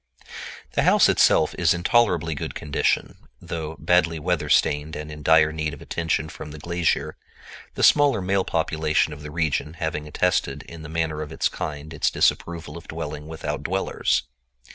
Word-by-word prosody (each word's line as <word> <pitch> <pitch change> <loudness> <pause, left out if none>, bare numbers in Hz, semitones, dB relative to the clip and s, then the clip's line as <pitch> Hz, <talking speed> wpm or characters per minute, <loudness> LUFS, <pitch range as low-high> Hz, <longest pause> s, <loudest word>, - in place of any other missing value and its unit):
The - - +1
house - - +5
itself - - +4
is - - +4
in 85 - -5
tolerably 90 -8 +2
good 70 - -5
condition, 75 -2 -1 0.2
though 80 -1 -5
badly 85 +2 +2
weather 75 -1 -1
stained 75 +1 +2
and 75 0 -6
in 75 0 -9
dire 80 0 +5
need 80 -2 -3
of - - -16
attention 80 -3 -1
from 75 0 -9
the 75 - -9
glazier, 85 +2 -1 0.6
the - - -2
smaller 145 -5 +5
male 95 +1 +1
population 80 -2 0
of 75 - -10
the 75 - -7
region 75 -1 -1
having 80 -2 -3
attested 90 +4 0
in 85 -1 -11
the 80 - -9
manner 80 -1 -2
of 75 - -6
its - - +1
kind 75 +1 -6
its 75 - +1
disapproval 85 -2 0
of - - -18
dwelling 75 +1 -6
without 80 0 -4
dwellers. - - 0
80 Hz, 170 wpm, -24 LUFS, 75-85 Hz, 0.6 s, house